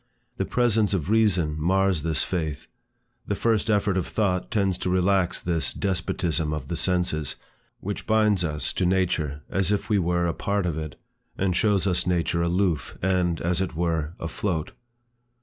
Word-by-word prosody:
The - - 0
presence 110 -5 +2
of 90 +2 -2
Reason 95 -9 +3
mars 95 0 +2
this 80 -3 +1
faith. 80 -5 -3 0.6
The 100 - 0
first 110 +1 +1
effort 100 -2 +2
of 90 - -1
thought 95 -4 0
tends 100 -5 +1
to - - -2
relax 90 0 +2
this 85 -2 -1
despotism 85 -4 -1
of 75 - -5
the 85 - -2
senses, 85 -5 0 0.5
which 100 +1 -5
binds 105 -4 +3
us 75 -4 -1
to 95 - 0
nature 85 -6 0
as 95 0 0
if 105 - -1
we 105 - +4
were 85 0 +1
a 85 - 0
part 100 -2 -1
of 85 -3 -1
it, 75 -3 -6 0.4
and 95 -2 0
shows 100 0 +2
us 90 -2 +1
nature 85 -1 +1
aloof, 85 -4 0
and, 90 -3 +1
as 90 +2 0
it 95 -4 -3
were, 80 -1 -1
afloat. 80 0 -3
90 Hz, 165 wpm, -25 LUFS, 85-100 Hz, 0.6 s, we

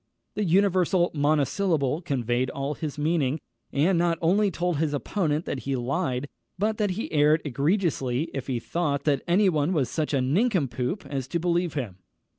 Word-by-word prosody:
The 210 - -1
universal 185 -1 +3
monosyllable 150 +1 +1
conveyed 125 -5 -1
all 140 +1 -3
his 150 -1 -5
meaning, 150 -2 +1 0.3
and 165 +5 +2
not 170 -1 +2
only 200 +5 +3
told 175 -2 -1
his 150 -1 0
opponent 155 0 -1
that 135 - -3
he 135 0 -2
lied, 130 +1 -1 0.3
but 215 +3 0
that 210 -1 +2
he 225 - -4
erred 150 +1 +3
egregiously 145 - 0
if 135 - -4
he 125 -3 -1
thought 145 +1 -1
that 140 -3 +1
any 190 +4 +4
one 155 0 +1
was 140 -7 0
such 155 -2 -1
a - - +2
nincompoop 155 - 0
as 135 -3 -4
to 170 - -1
believe 175 -1 0
him. 110 -10 -4
155 Hz, 170 wpm, -26 LUFS, 140-175 Hz, 0.3 s, any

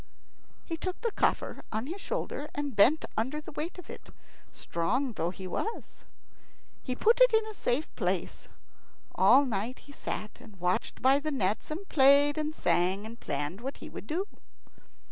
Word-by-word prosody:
He 330 - -4
took 365 +2 -4
the 465 -1 0
coffer - - 0
on 220 +2 -2
his 360 +7 -6
shoulder, 300 - -3
and 290 -4 -3
bent 255 +11 +5
under 260 +7 -1
the 305 - -10
weight 310 +5 -4
of 360 - -10
it, - - -10 0.4
strong 235 +10 -1
though 170 -5 -1
he 190 +1 -8
was. 425 - -5 0.8
He 255 - -3
put 455 - +4
it - - +8
in 440 0 +3
a 435 - -7
safe 290 -6 0
place. - - -2 0.7
All 280 +1 +6
night 230 +1 -2
he 285 - -15
sat 215 -6 -6
and 205 -4 -15
watched 180 +5 -1
by 270 +2 +6
the 310 +2 -2
nets, 210 -8 -1
and 350 +6 -5
played 285 +1 +5
and 305 0 -2
sang, 185 - +1
and 230 +2 -9
planned 145 +7 -3
what 270 +3 -5
he - - -9
would - - -8
do. 350 +8 -1
275 Hz, 175 wpm, -30 LUFS, 215-310 Hz, 0.8 s, it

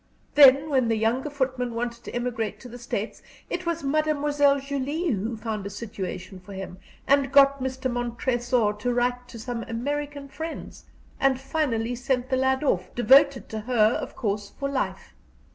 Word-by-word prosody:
Then 280 +1 +7
when 260 -4 +3
the 225 - +2
younger 230 +6 0
footman 260 -4 -2
wanted 235 0 -4
to - - -6
emigrate 240 -3 -2
to 250 - -9
the 245 +1 -10
States, 230 -2 -4 0.3
it 365 - -3
was 335 -2 -1
Mademoiselle 290 -1 +2
Julie 280 +4 -2
who 220 +2 -2
found 215 -2 -4
a 200 - -5
situation 190 -3 -6
for 200 +2 -12
him, 190 -1 -7 0.3
who 280 0 +4
got 275 0 +5
Mr. 260 0 -2
Montresor 240 -1 0
to 245 +3 0
write 245 0 0
to 240 - -10
some 230 +1 -4
American 285 +4 -3
friends, 320 +4 -7 0.3
and 270 -1 +3
finally 265 -5 -1
sent 250 +1 -1
the 260 - +3
lad 265 +1 +1
off, 185 -10 +1
devoted 270 +2 +5
to 220 - -4
her, 220 -1 +3
of - - -7
course, 205 -2 -2
for 275 - -1
life. 275 -1 -3
250 Hz, 170 wpm, -25 LUFS, 230-280 Hz, 0.3 s, Then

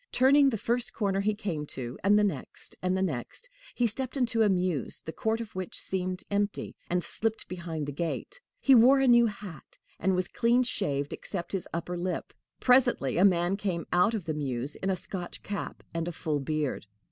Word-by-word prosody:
Turning 275 +2 +5
the 225 - -1
first 235 +3 -1
corner 195 -3 0
he 210 +1 +1
came 190 -8 -3
to, 125 -4 -6
and 205 +2 +5
the 210 - +4
next 200 - -3
and 185 +1 +1
the 190 - +1
next, 160 - -4 0.3
he 245 - +2
stepped 255 +4 -2
into 235 -3 +1
a 215 - +5
mews, 180 -7 +1
the 160 - -7
court 220 +1 0
of 230 -3 -7
which 185 -1 -4
seemed 185 -1 -2
empty, 205 0 -1
and 175 0 +1
slipped 225 0 -2
behind 170 -4 -4
the 145 - -4
gate. 170 - -4 0.2
He 275 - +5
wore 255 +3 +7
a 270 - +3
new 240 -1 +6
hat, 200 -8 -9 0.2
and 190 +2 +2
was 180 -1 0
clean 240 +4 +2
shaved 145 - -1
except 175 -4 -5
his 195 -3 -2
upper 170 +1 -3
lip. 180 +1 -3 0.3
Presently 245 - +3
a - - +5
man 180 0 +3
came 185 -5 -2
out 180 +6 +4
of 200 -6 -4
the 160 - -1
mews 135 -2 -3
in 190 - -3
a 190 - +2
Scotch 180 0 -6
cap 200 0 -5
and 165 0 -2
a - - -2
full 155 -2 -2
beard. 145 -5 -2
190 Hz, 205 wpm, -29 LUFS, 170-225 Hz, 0.3 s, wore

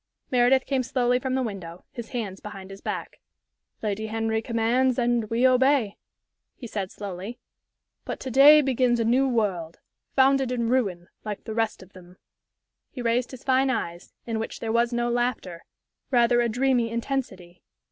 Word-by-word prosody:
Meredith 255 +1 +4
came 270 -1 0
slowly 250 -1 +1
from 260 0 -2
the 265 - 0
window, 185 -6 -7
his 235 -2 -8
hands 205 -6 -4
behind 195 -2 -9
his 195 - -11
back. - - -5 0.6
"Lady 215 +1 -2
Henry 220 0 -1
commands 235 +2 +1
and 240 -3 +1
we 235 +3 +2
obey," 255 -4 +3 0.6
he 250 - -10
said, 200 -4 -4
slowly. 200 +3 -7 0.7
"But - - -5
to 260 - -5
day 290 +4 +8
begins 255 -3 +1
a 230 - +1
new 255 +4 +3
world 195 -9 -1 0.4
founded 270 -1 +4
in 235 -2 -1
ruin, 195 -9 0
like 210 -2 -5
the 220 - -6
rest 225 -3 -1
of 185 - -20
them." 180 0 -15 0.7
He 250 - -7
raised 235 +1 +1
his 260 - -11
fine 265 0 +2
eyes, 175 -8 -3
in 225 -2 -2
which 225 - -5
there 225 - -3
was 235 +1 +2
no 240 0 0
laughter, 240 -8 -2 0.4
rather 240 -1 +4
a 235 - +1
dreamy 245 0 +1
intensity. 230 -8 -4
235 Hz, 170 wpm, -25 LUFS, 210-255 Hz, 0.7 s, day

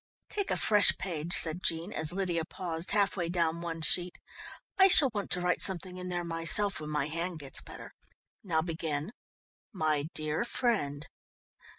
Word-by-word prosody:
"Take 405 -1 -2
a - - 0
fresh 210 -2 +6
page," 170 -3 -5
said 165 +2 +2
Jean, 170 +5 -2
as 155 -1 -3
Lydia 180 -3 -2
paused 170 0 -5
half 200 -2 +1
way 175 -3 -3
down 170 -1 -1
one 165 -1 -5
sheet. 175 +3 +1 0.6
"I 385 - +8
shall 290 -8 +7
want 205 -2 -4
to 180 - +1
write 180 0 0
something 185 -1 0
in 180 0 -6
there 175 -1 -2
myself 170 +4 +2
when 150 -1 -7
my 150 -2 -1
hand 170 +3 -3
gets 140 -3 -5
better. - - -12 0.5
Now 160 -5 0
begin: 160 0 -4 0.6
"MY 155 -5 0
DEAR 155 +5 -1
FRIEND." 200 - -2
170 Hz, 170 wpm, -30 LUFS, 160-190 Hz, 0.6 s, I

